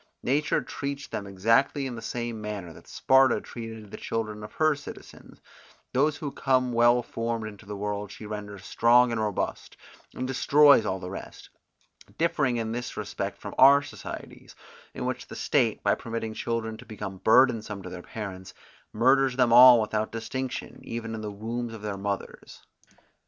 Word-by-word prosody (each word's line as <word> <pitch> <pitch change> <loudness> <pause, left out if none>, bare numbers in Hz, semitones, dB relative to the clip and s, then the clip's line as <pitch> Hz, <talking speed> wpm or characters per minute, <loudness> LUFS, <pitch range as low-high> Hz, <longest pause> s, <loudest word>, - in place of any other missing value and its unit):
Nature 145 +4 +1
treats 140 0 -5
them 100 - -6
exactly 115 +9 +2
in 130 - -4
the 115 - -7
same 120 -2 -4
manner 100 -5 -6
that - - -16
Sparta 130 -2 +4
treated 110 -3 -9
the - - -7
children 110 -2 -4
of 105 - -10
her 155 -1 +3
citizens; 145 0 -12 0.5
those 145 +3 +2
who 145 -3 -5
come 130 -2 +1
well 120 +1 +4
formed 115 -1 -3
into 105 -1 -12
the 105 - -5
world 105 0 -4
she 110 - -10
renders 105 -2 -7
strong 120 +1 +4
and 115 -1 -1
robust, 105 -3 -3 0.4
and 130 - -3
destroys 140 -2 +5
all 95 - -2
the 90 0 -7
rest; 95 - -9 0.7
differing 150 -7 +1
in 115 -1 -2
this 120 +1 -5
respect - - -4
from - - -8
our 140 +2 +8
societies, - - -9 0.4
in - - -4
which - - -3
the - - -9
state, - - +1
by - - +3
permitting 115 -1 -4
children 110 0 -3
to 125 - -13
become 105 -3 -7
burdensome 110 -3 +3
to - - -7
their 90 - -7
parents, 95 -2 -8 0.4
murders 130 +3 +3
them 125 -2 +3
all 125 0 +10
without 110 0 -1
distinction, 130 +3 -5
even 115 -1 -5
in 110 - -5
the 105 - -4
wombs 115 +3 -5
of 110 - -11
their 105 -2 -3
mothers. 100 0 -6
115 Hz, 170 wpm, -27 LUFS, 105-130 Hz, 0.7 s, all